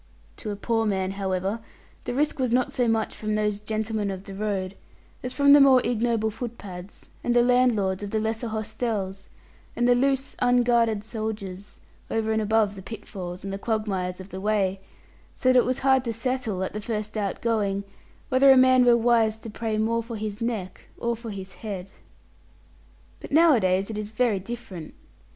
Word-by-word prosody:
To 215 - -6
a 205 - -2
poor 225 +2 0
man, 190 -2 0
however, 195 +2 -2 0.5
the - - -2
risk 295 +1 0
was 255 -2 +1
not 250 +1 +2
so 245 -2 +1
much 225 -1 0
from 215 0 -2
those 210 -1 0
gentlemen 215 -1 -2
of 190 -1 -5
the 200 - -9
road 195 -2 -2 0.5
as 250 - -4
from 280 +1 +5
the 290 - +8
more 270 -2 +7
ignoble 230 -2 +1
footpads, 205 -5 -8 0.2
and 240 - +1
the 240 - +6
landlords 240 -7 +2
of 205 - -4
the 220 - 0
lesser 220 +2 -2
hostels, 215 -3 -3 0.5
and 240 - +2
the 245 - +6
loose 270 +2 +1
unguarded 240 -3 +3
soldiers, 210 -3 -6 0.3
over 220 0 0
and 220 - +1
above 215 -1 +2
the 195 - -9
pitfalls 185 -4 -7
and 195 0 -4
the 195 - -4
quagmires 195 -5 -2
of 190 +1 -10
the 190 0 -7
way; 195 -2 0 0.5
so 255 - +1
that 255 -1 +6
it - - +2
was 255 +1 0
hard 265 -1 +4
to 230 - -1
settle, 230 -5 -2
at 190 - -4
the 210 - -4
first 215 -1 -4
outgoing 205 -1 -1 0.5
whether 265 +2 +5
a 265 - +8
man 255 0 +6
were 240 -1 +6
wise 225 -2 +3
to 220 0 -9
pray 220 0 -2
more 230 +2 +1
for 230 0 -7
his 210 0 -5
neck 220 -6 -3 0.2
or 235 0 -1
for 230 0 -8
his 190 -2 -7
head. 195 -4 -6 1.3
But - - -10
nowadays 225 - +4
it 210 - -4
is 210 -1 -4
very 220 -2 +1
different. 190 -6 -8
220 Hz, 185 wpm, -25 LUFS, 200-240 Hz, 1.3 s, the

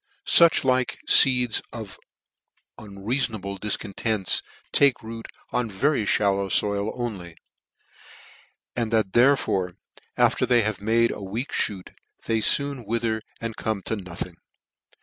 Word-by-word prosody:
fiich 170 -2 +5
like 130 -1 +1
feeds 125 -4 +6
of 110 -5 -9 0.8
unreaforuble 105 -1 -3
difcontents, 105 0 -1 0.3
take 140 -5 +3
root 115 0 -8 0.2
on 120 -2 -1
very 110 +2 0
Shallow 100 -1 +1
foil 100 +3 0
only; 95 -9 -6 1.4
and 115 -2 -2
that 110 -4 +1
therefore, 120 -8 +2 0.4
after - - +2
they 120 -2 +4
have 105 -2 -2
made 115 +2 +2
a - - -7
weak, 110 +8 -5 0.2
moot, 95 -3 -10 0.3
they 110 -1 0
foon 140 +1 0
wither 115 0 -1 0.2
and 115 -1 -5
come 110 -3 -3
to 110 - -2
nothing. 90 -3 -7
110 Hz, 120 wpm, -24 LUFS, 100-120 Hz, 1.4 s, feeds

